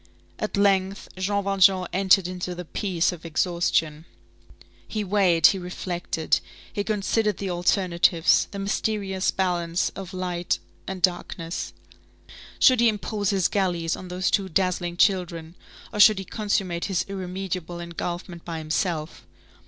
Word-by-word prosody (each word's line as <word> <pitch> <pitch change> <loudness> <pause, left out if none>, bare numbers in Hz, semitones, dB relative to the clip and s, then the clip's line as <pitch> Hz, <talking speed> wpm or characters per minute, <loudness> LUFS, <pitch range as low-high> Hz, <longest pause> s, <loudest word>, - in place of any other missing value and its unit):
At 210 - -2
length, 195 -1 +1
Jean 200 +2 -1
Valjean 195 -1 +4
entered 190 -1 +4
into 180 0 -4
the 180 0 -7
peace 180 0 0
of 175 -2 -9
exhaustion. 165 -2 0 0.8
He 215 -1 -3
weighed, 185 -4 +3
he 195 - +6
reflected, 175 -2 -2 0.3
he 205 - -1
considered 210 0 0
the 195 -2 -3
alternatives, 175 -1 +3
the 200 - -8
mysterious 195 -1 -1
balance 175 -2 0
of 190 -2 -8
light 180 -2 -2 0.3
and 190 -2 -5
darkness. 175 -1 -1 0.9
Should 255 -2 +5
he 235 0 +5
impose 210 -1 -2
his 195 -3 +2
galleys 175 -5 0
on 185 - -9
those 180 +1 -1
two 195 -2 +1
dazzling 175 -1 0
children, 170 -4 +1 0.4
or 210 - -4
should 210 0 +8
he 195 - -5
consummate 195 -4 -1
his 185 -4 -1
irremediable 185 -2 -5
engulfment 175 0 -5
by 165 -1 -5
himself? 160 0 -3
185 Hz, 135 wpm, -25 LUFS, 175-195 Hz, 0.9 s, should